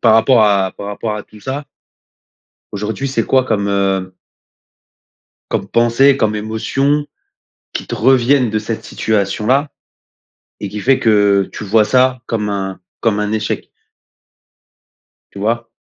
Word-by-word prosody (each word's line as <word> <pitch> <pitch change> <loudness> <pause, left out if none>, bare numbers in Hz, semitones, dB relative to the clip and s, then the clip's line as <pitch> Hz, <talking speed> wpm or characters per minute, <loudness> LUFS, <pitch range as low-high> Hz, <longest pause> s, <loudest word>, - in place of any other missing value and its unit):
par 110 -2 +5
rapport 115 0 +5
à 100 -3 +2
par 100 - -8
rapport 105 +1 -3
à 105 - -5
tout 105 +1 -17
ça. 140 +4 -5 1.1
Aujourd'hui 110 +7 -3
c'est 115 -4 0
quoi 130 -1 +3
comme, 100 -4 -1
heu 95 -2 0 1.4
comme - - -2
pensées, 120 +4 +4
comme 110 -5 +1
émotions 135 +7 -1 0.7
qui - - -5
te - - -4
reviennent 130 0 +3
de 110 - 0
cette 110 +1 -5
situation-là, 110 +7 0 0.9
et 100 - -4
qui 105 +2 -6
fait 130 +5 +2
que 100 -3 +3
tu 110 - -7
vois 105 +2 +3
ça 130 +1 +2
comme 105 -2 -2
un 95 -2 -3 0.2
comme 110 -3 +1
un 105 0 -1
échec? 110 -1 -2 1.6
Tu 100 - -10
vois? 115 +3 -1
110 Hz, 140 wpm, -17 LUFS, 105-125 Hz, 1.6 s, par